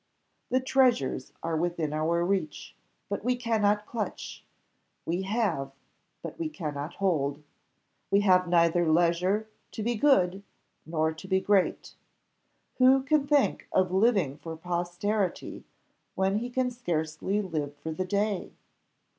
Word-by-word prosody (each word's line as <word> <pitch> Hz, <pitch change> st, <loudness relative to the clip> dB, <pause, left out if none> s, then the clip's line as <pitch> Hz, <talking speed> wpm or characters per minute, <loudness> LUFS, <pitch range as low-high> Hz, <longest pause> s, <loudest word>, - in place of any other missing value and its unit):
The 255 Hz, -, +2 dB
treasures 255 Hz, -, +1 dB
are 165 Hz, 0 st, -1 dB
within 165 Hz, -2 st, -1 dB
our 165 Hz, +3 st, +1 dB
reach, 185 Hz, -5 st, -2 dB, 0.3 s
but 200 Hz, 0 st, -4 dB
we 250 Hz, +2 st, +1 dB
cannot 210 Hz, -3 st, +1 dB
clutch; 225 Hz, -2 st, -5 dB, 0.6 s
we 175 Hz, +3 st, -1 dB
have, 190 Hz, -, -1 dB, 0.5 s
but -, -, -7 dB
we 325 Hz, -2 st, -2 dB
cannot 150 Hz, -, -5 dB
hold. 150 Hz, -7 st, 0 dB, 0.7 s
We 200 Hz, -, +4 dB
have 185 Hz, -2 st, +4 dB
neither 170 Hz, -1 st, +3 dB
leisure 175 Hz, +6 st, +2 dB, 0.3 s
to 215 Hz, -, -4 dB
be 240 Hz, +2 st, 0 dB
good, 200 Hz, -7 st, +3 dB, 0.5 s
nor 160 Hz, -1 st, 0 dB
to 160 Hz, +4 st, -11 dB
be 190 Hz, 0 st, +2 dB
great: 195 Hz, -1 st, +1 dB, 0.9 s
who 260 Hz, +1 st, +6 dB
can 285 Hz, 0 st, +2 dB
think 290 Hz, -2 st, +2 dB
of 185 Hz, -1 st, +2 dB
living 190 Hz, -, +2 dB
for 165 Hz, 0 st, -7 dB
posterity, 175 Hz, +3 st, -2 dB, 0.5 s
when 190 Hz, +1 st, +1 dB
he 240 Hz, +2 st, -4 dB
can 250 Hz, 0 st, 0 dB
scarcely 175 Hz, -4 st, -2 dB
live 155 Hz, -7 st, -3 dB
for 160 Hz, -, -6 dB
the 160 Hz, +4 st, -2 dB
day? 200 Hz, 0 st, -1 dB
185 Hz, 130 wpm, -28 LUFS, 165-215 Hz, 0.9 s, who